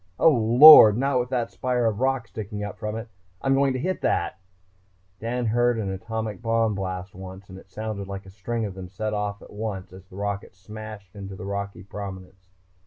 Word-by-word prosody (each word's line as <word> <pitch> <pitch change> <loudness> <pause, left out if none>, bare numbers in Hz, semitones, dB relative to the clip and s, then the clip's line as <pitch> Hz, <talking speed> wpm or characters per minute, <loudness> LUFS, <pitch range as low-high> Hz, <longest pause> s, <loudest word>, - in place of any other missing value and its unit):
Oh, 165 - +6
Lord! 120 -1 +9
Not 135 0 +1
with 125 0 -2
that 120 -3 -1
spire 125 -2 -1
of 110 -2 0
rock 130 -2 0
sticking 105 -2 -6
up 105 - -6
from 105 -1 -4
it.... 115 +1 -6 0.3
I'm 135 - +1
going 135 0 +3
to - - -2
hit 185 +7 -2
that - - 0 0.4
..." 95 0 -39
Dan 120 +2 -2
had 110 - 0
heard 120 0 +2
an 100 -3 -2
atomic 110 +3 -5
bomb 115 -2 +1
blast 95 -1 -5
once 95 +1 -10
and 95 0 -10
it 95 - -19
sounded 105 -1 -5
like 100 0 -7
a 95 - -12
string 110 +4 -3
of 100 - -5
them 95 -1 -9
set 105 +3 -4
off 105 -1 -3
at - - -14
once 105 -4 -5
as 95 0 -13
the 90 - -15
rocket 100 -1 -4
smashed 105 0 -10
into 100 -1 -8
the 95 - -8
rocky 100 -1 -5
prominence. 95 -2 -9
105 Hz, 215 wpm, -25 LUFS, 95-115 Hz, 0.4 s, Lord